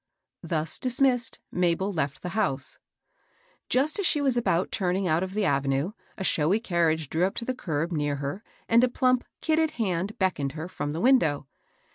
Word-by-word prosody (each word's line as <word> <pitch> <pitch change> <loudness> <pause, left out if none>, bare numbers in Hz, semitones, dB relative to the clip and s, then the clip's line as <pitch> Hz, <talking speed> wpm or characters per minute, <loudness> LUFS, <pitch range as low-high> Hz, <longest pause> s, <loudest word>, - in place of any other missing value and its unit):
Thus 160 -2 -2
dismissed, 250 -2 +2
Mabel 180 +3 +1
left 140 -4 -2
the 180 - -3
house« 140 -10 -1 0.9
Just 290 +9 +2
as 400 - 0
she 300 - +2
was 270 -3 +3
about 190 -7 +1
turning 185 0 0
out 160 +1 +2
of 190 +1 -4
the 210 -1 +1
avenue 140 +3 +1 0.3
a 190 - -4
showy 175 +4 +2
carriage 165 - +1
drew 160 +5 0
up 195 - -2
to 235 - -3
the 255 - -1
curb 165 - -2
near 145 -3 0
hei. 140 +6 -4 0.3
and 230 +2 +5
a 255 - +4
plump 255 0 +2 0.2
kidded 320 0 +2
hand 195 -2 -1
beckoned 150 -8 0
her 160 +2 -5
from 145 -5 -4
the 165 - -3
window. 165 - +3
180 Hz, 180 wpm, -27 LUFS, 155-235 Hz, 0.9 s, and